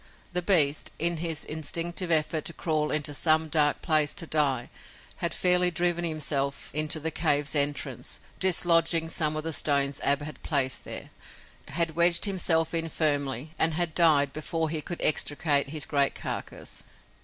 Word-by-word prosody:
The 180 - -1
beast, 155 -6 +3
in 170 +1 +1
his 160 -1 -3
instinctive 170 +3 -2
effort 155 -1 +1
to 170 - -1
crawl 155 -2 -2
into 150 -1 -2
some 155 +2 +2
dark 150 -1 +1
place 155 -3 +1
to 190 -4 -3
die, 140 -6 -1 0.5
had 170 - -1
fairly 180 +1 +3
driven 175 0 0
himself 145 -4 -2
into 155 +1 +1
the 160 +2 -2
cave's 145 -2 +1
entrance, 145 -1 -1 0.2
dislodging 165 -2 +3
some 155 -2 0
of 155 - -4
the 165 0 -2
stones 140 -1 +1
Ab 140 +1 +1
had 155 +1 -9
placed 135 -4 0
there, - - -6 0.6
had 160 +2 -1
wedged 170 0 +5
himself 170 -5 +1
in 165 -1 -1
firmly, 145 -2 -1
and 160 -1 +3
had 170 -1 -1
died 150 -5 +3
before 160 +1 -3
he 160 -2 -2
could 170 +3 -7
extricate 145 -1 +2
his 150 -2 -1
great 140 -1 0
carcass. - - -6
155 Hz, 160 wpm, -26 LUFS, 145-170 Hz, 0.6 s, wedged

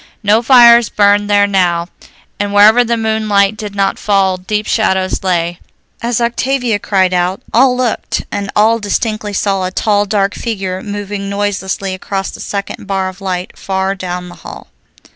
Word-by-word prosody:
No 210 +2 +3
fires 235 -2 +6
burned 205 0 +2
there 205 0 +4
now, 180 -4 +1 0.5
and 205 0 -2
wherever 215 +4 +6
the 235 0 -1
moonlight 215 -2 +1
did 210 -1 -7
not 195 -1 0
fall 195 -2 +1
deep 210 +3 -3
shadows 190 -4 0
lay. 175 -2 -1 0.4
As 235 0 -1
Octavia 240 -1 0
cried 190 -2 +1
out, 180 +2 0
all 250 +1 +4
looked, 250 -3 -2
and 200 0 -3
all 225 +2 +3
distinctly 215 0 -2
saw 195 -1 0
a 185 - -1
tall, 205 +2 0
dark 200 -1 0
figure 190 -5 -4
moving 205 -1 -5
noiselessly 200 -1 -2
across 195 +1 -4
the - - -11
second 200 0 -5
bar 190 -1 -1
of 185 +1 -13
light 185 -1 -4
far 190 0 -1
down 180 -2 -5
the - - -12
hall. - - -11
200 Hz, 160 wpm, -14 LUFS, 190-215 Hz, 0.5 s, fires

